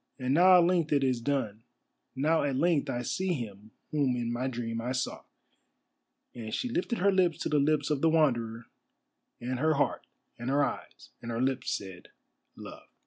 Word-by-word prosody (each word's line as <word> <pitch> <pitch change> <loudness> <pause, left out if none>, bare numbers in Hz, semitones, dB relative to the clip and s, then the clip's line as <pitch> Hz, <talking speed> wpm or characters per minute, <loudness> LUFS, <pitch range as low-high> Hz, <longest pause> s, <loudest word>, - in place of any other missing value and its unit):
And 130 -1 -1
now 180 +4 +7
at 175 - +6
length 170 -3 +1
it 140 -2 +3
is 130 -3 +1
done, 115 -5 -2 0.5
now 155 +4 +2
at 140 -2 0
length 165 +1 +1
I 120 0 -2
see 185 +8 -1
him 110 - -7 0.2
whom 140 -5 +1
in 120 -1 -2
my 125 +2 -2
dream 115 -2 -3
I 125 +2 -2
saw," 130 0 -3 1.1
and 110 -2 -7
she 250 - -2
lifted 235 0 -1
her 200 +2 +3
lips 180 -5 +2
to - - -1
the 150 -1 +2
lips 150 +1 +1
of 145 -2 0
the 165 - +4
Wanderer, 120 -8 +1 0.7
and 125 +1 -3
her 155 +2 +2
heart, 145 - -1 0.3
and 120 +2 -4
her 140 +1 +3
eyes, - - -7
and 120 - -7
her 115 0 -2
lips 130 0 0
said 95 -3 -10 0.5
"Love." - - -11
135 Hz, 190 wpm, -29 LUFS, 120-155 Hz, 1.1 s, now